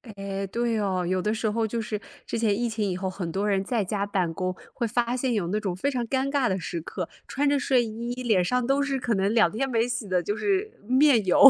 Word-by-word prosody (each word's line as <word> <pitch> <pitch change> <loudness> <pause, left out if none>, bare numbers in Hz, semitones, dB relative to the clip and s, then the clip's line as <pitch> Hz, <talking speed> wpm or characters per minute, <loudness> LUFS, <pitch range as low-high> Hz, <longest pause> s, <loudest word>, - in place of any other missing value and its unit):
哎， 195 0 -3
对 230 +1 0
哦， 190 -3 0
有 185 0 +1
的 210 +4 0
时 220 -1 0
候 225 +1 0
就 230 +1 -2
是， 215 -1 -3 0.3
之 - - -2
前 215 -3 +2
疫 240 -1 0
情 220 -2 -1
以 180 - -1
后， 190 0 -2
很 180 -3 -4
多 200 +3 0
人 195 -1 +2
在 225 0 0
家 200 +1 -1
办 185 -4 0
公， 185 +1 -2 0.2
会 240 - -1
发 240 +2 0
现 255 -1 0
有 195 -6 0
那 210 +4 0
种 190 -4 -2
非 280 +10 0
常 245 -4 -1
尴 265 +2 0
尬 275 -3 +2
的 190 -2 0
时 170 0 -4
刻， 175 +2 -5 0.2
穿 285 +1 +1
着 285 - +3
睡 250 -2 +3
衣， 235 +2 -4
脸 205 -7 +3
上 250 +4 +1
都 280 +1 +3
是 275 -2 -1
可 235 -3 0
能 195 +3 +1
2 210 -7 +5
天 270 +5 -1
没 235 -1 +1
洗 235 -3 -3
的 180 -1 +2
就 205 +5 -2
是 405 +1 0 0.2
面 255 -4 +5
油。 230 +9 +9
220 Hz, 275 characters per minute, -26 LUFS, 195-245 Hz, 0.3 s, 油